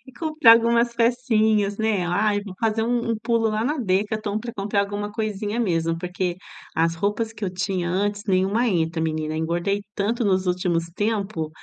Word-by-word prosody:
e 260 - -13
comprar 310 -4 +5
algumas 235 +1 +3
pecinhas, 220 -4 +2
né. 215 -5 +1
Ai, 205 +3 +1
vou 195 -3 -8
fazer 225 0 +1
um 240 +2 +1
um 225 - 0
pulo 230 -1 +1
lá 215 +1 -1
na 295 +3 -1
Decathlon, 210 0 0
pra 235 +1 -6
comprar 200 0 0
alguma 205 +1 -3
coisinha 215 0 -3
mesmo, 165 -6 0
porque 180 0 -3 0.4
as 165 0 +2
roupas 210 +6 -1
que 220 - -15
eu 195 - 0
tinha 185 -1 -2
antes, 205 +3 -1
nenhuma 195 +6 +2
entra, 165 -3 0
menina. 155 -1 -2
Engordei 170 +5 -1
tanto 225 +4 -1
nos 190 -2 +1
últimos 180 -2 0
tempos, 205 -6 -1
205 Hz, 175 wpm, -23 LUFS, 185-225 Hz, 0.4 s, comprar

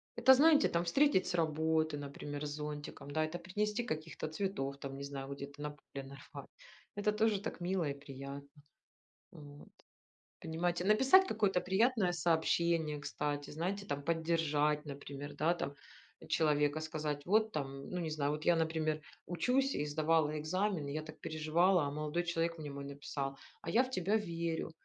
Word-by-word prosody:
Это 265 - +7
знаете, 300 +3 +6
там 170 0 0
встретить 230 +3 +3
с - - -2
работы, 160 -1 +1
например, 145 +1 -5
с - - -3
зонтиком, 150 -1 -6
да, 155 +2 +1
это 155 +3 -3
принести 210 +6 -1
каких-то 155 -6 -4
цветов, 155 -5 -2
там 135 -1 -6
не 140 - -6
знаю, 140 -1 -5
где-то 140 +1 -8
на 150 - -2
поле 140 -1 -9
нарвать. 135 0 -10 0.5
Это 205 +1 +1
тоже 215 -1 +2
так 190 - -5
мило 175 -2 0
и - - -1
приятно. 140 0 -8 0.8
Вот. 145 -1 -12 0.7
Понимаете, 175 +2 -1
написать 265 - +6
какое-то 200 - +1
приятное 200 -1 +2
сообщение, 165 -1 +1
кстати, 145 0 -3
знаете, 185 +6 -3
там 145 -5 -3
поддержать, 160 -2 +1
например, 145 0 -7
да, 160 +3 +2
там, 145 -5 -4 0.5
человека, 150 -1 +2
сказать 155 -2 -3
вот 220 +3 +3
там 135 -3 -4
Ну 180 - -3
не 165 -2 -2
знаю, 150 -2 0
вот 150 +1 -3
я, 175 - +5
например, 160 -1 0 0.3
учусь 250 +11 +1
и 145 - 0
сдавала 155 0 +2
экзамены, 175 -1 -1
я 155 +2 -3
так 155 0 -11
переживала, 160 +4 +2
а 140 - -2
молодой 150 +3 -1
человек 170 -1 -1
мне 150 -2 -6
мой 140 0 -6
написал: 140 -1 -4 0.2
"А - - -5
я 240 +4 +5
в 255 - -6
тебя 195 -2 +1
верю". 170 -6 -2
155 Hz, 165 wpm, -34 LUFS, 145-180 Hz, 0.8 s, Это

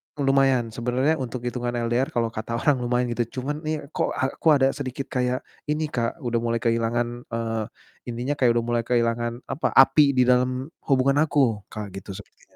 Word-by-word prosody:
m 145 - -3
lumayan 135 -4 +3
sebenernya 125 +7 0
untuk 125 -1 -5
hitungan 120 0 -3
LDR 120 +2 0
kalau 115 -1 +1
kata 115 +1 -4
orang 140 +4 +2
lumayan 125 0 0
gitu, 120 +2 -3
cuman 150 +3 -3
nih 155 -1 -2
kok - - -1
aku 135 +5 -2
ada 135 -1 +3
sedikit 135 -1 -5
kayak 125 0 0 0.2
ini, 150 0 -1
Kak, 120 +5 -2
udah 120 -1 0
mulai 115 0 -1
kehilangan, 120 +1 -1
eee, 115 -1 -1 0.5
ininya 125 +5 -2
kayak 120 -3 +4
udah 120 - +1
mulai 120 0 0
kehilangan, 120 0 0
apa, 145 - -1
api 140 +1 +6
di 130 - +4
dalam 125 +2 +1 0.2
hubungan 135 0 +3
aku, 120 -9 +1
Kak, 105 -2 -7
gitu 95 0 -8
sepertinya. - - -15
125 Hz, 180 wpm, -24 LUFS, 115-135 Hz, 0.5 s, api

